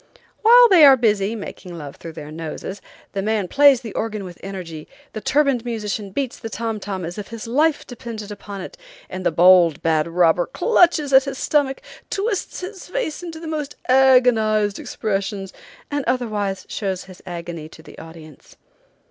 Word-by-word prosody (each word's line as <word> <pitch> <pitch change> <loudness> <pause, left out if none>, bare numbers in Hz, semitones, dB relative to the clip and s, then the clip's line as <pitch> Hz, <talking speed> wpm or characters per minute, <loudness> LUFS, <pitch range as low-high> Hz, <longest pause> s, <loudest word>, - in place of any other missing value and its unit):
While 485 +2 +8
they 360 -5 +7
are 275 -2 +9
busy, 215 -2 +1
making 185 -4 -8
love 145 -3 -8
through 165 - -9
their 150 -1 -9
noses, 165 +5 -6 0.3
the 195 - -2
man 210 -2 -1
plays 280 +2 +5
the 225 -5 -8
organ 215 -2 -3
with 180 -2 -10
energy, 180 -5 -7 0.3
the 215 - -5
turbaned 280 -4 +2
musician 215 -3 -4
beats 260 +5 -4
the 225 - -6
tom 225 -1 -3
tom 190 -3 -5
as 175 +5 -6
if 205 - -7
his 230 -2 -8
life 290 +6 +1
depended 230 -4 -8
upon 200 -1 -8
it, - - -9 0.3
and 185 0 -5
the - - +2
bold, 175 -2 +5
bad 160 -1 +2
robber 175 0 +2
clutches 325 - +2
at 265 +1 +7
his 275 -1 -5
stomach, 280 -2 0 0.3
twists 400 -2 -2
his 380 +1 -8
face - - -3
into 335 -2 -7
the 330 - -9
most 300 -2 -4
agonized 245 -6 +4
expressions, 195 -2 -3 0.4
and 285 -1 -1
otherwise 210 -6 -1
shows 190 -3 -3
his 185 -1 -14
agony 170 -3 -6
to 160 - -15
the - - -13
audience. 160 -3 -13
215 Hz, 175 wpm, -21 LUFS, 185-270 Hz, 0.4 s, are